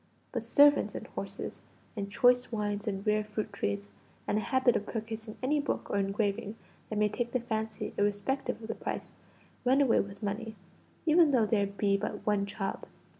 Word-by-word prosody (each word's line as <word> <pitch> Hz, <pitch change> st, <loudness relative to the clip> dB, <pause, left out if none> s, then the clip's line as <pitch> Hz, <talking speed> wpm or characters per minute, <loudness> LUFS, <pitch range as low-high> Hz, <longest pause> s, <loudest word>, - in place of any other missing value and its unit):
But 240 Hz, -, -2 dB
servants 285 Hz, +6 st, +5 dB
and -, -, -5 dB
horses, -, -, -6 dB, 0.3 s
and 200 Hz, -2 st, -3 dB
choice 245 Hz, +3 st, +4 dB
wines 205 Hz, -1 st, -2 dB
and 195 Hz, -1 st, -2 dB
rare 210 Hz, 0 st, +3 dB
fruit 210 Hz, 0 st, -4 dB
trees, 100 Hz, 0 st, -2 dB, 0.4 s
and 210 Hz, -, +2 dB
a -, -, -1 dB
habit 260 Hz, +1 st, +3 dB
of 210 Hz, -, -1 dB
purchasing 220 Hz, -1 st, -5 dB
any 295 Hz, +3 st, +2 dB
book 285 Hz, -, -2 dB
or -, -, +1 dB
engraving 200 Hz, +1 st, -1 dB, 0.3 s
that 215 Hz, -, -3 dB
may 210 Hz, 0 st, +4 dB
take 235 Hz, +3 st, -3 dB
the 255 Hz, -, +2 dB
fancy, 220 Hz, -2 st, -3 dB
irrespective 205 Hz, +8 st, 0 dB
of -, -, -6 dB
the 225 Hz, -, -2 dB
price, -, -, -5 dB, 0.5 s
run 260 Hz, +2 st, +4 dB
away 270 Hz, -5 st, +4 dB
with 200 Hz, +2 st, -4 dB
money, 215 Hz, +2 st, -3 dB, 0.5 s
even 325 Hz, 0 st, +6 dB
though 250 Hz, -6 st, +4 dB
there 205 Hz, -2 st, +2 dB
be 200 Hz, 0 st, +1 dB
but 210 Hz, +1 st, -4 dB
one 205 Hz, -1 st, +2 dB
child. 195 Hz, -1 st, -4 dB
215 Hz, 180 wpm, -31 LUFS, 205-245 Hz, 0.5 s, even